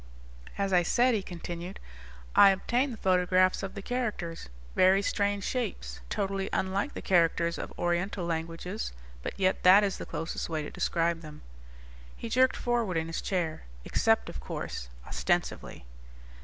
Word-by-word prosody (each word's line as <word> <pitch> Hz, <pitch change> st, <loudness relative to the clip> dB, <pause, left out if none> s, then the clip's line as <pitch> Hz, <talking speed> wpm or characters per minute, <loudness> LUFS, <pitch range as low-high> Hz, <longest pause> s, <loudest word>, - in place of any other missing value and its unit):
"As 195 Hz, -1 st, 0 dB
I 180 Hz, -, +6 dB
said," 245 Hz, +8 st, +3 dB
he 215 Hz, -, +1 dB
continued, 175 Hz, 0 st, -7 dB, 0.6 s
"I 200 Hz, -, +9 dB
obtained 240 Hz, +8 st, +1 dB
the 230 Hz, -, -7 dB
photographs 185 Hz, -1 st, +3 dB
of 195 Hz, +1 st, -5 dB
the 200 Hz, -, -6 dB
characters. 210 Hz, -, -3 dB, 0.3 s
Very 190 Hz, +2 st, +5 dB
strange 200 Hz, -1 st, 0 dB
shapes, 65 Hz, -, -3 dB
totally 195 Hz, -1 st, -1 dB
unlike 195 Hz, +9 st, -1 dB
the -, -, -6 dB
characters 170 Hz, -1 st, +2 dB
of -, -, -5 dB
Oriental 175 Hz, +2 st, -1 dB
languages, 165 Hz, -, -3 dB, 0.3 s
but -, -, -6 dB
yet 185 Hz, -1 st, +2 dB
that 190 Hz, +3 st, +8 dB
is 195 Hz, -2 st, -1 dB
the -, -, -6 dB
closest 165 Hz, +2 st, -4 dB
way 155 Hz, -2 st, -2 dB
to -, -, -7 dB
describe 170 Hz, -1 st, 0 dB
them." 150 Hz, -2 st, -11 dB, 0.7 s
He 230 Hz, -, -6 dB
jerked 255 Hz, +3 st, +3 dB
forward 235 Hz, -7 st, 0 dB
in 160 Hz, -, 0 dB
his 165 Hz, 0 st, -4 dB
chair, 170 Hz, -, -2 dB, 0.2 s
"Except, -, -, +2 dB
of -, -, -6 dB
course, -, -, -5 dB, 0.2 s
ostensively." -, -, -2 dB
185 Hz, 155 wpm, -29 LUFS, 170-200 Hz, 0.7 s, I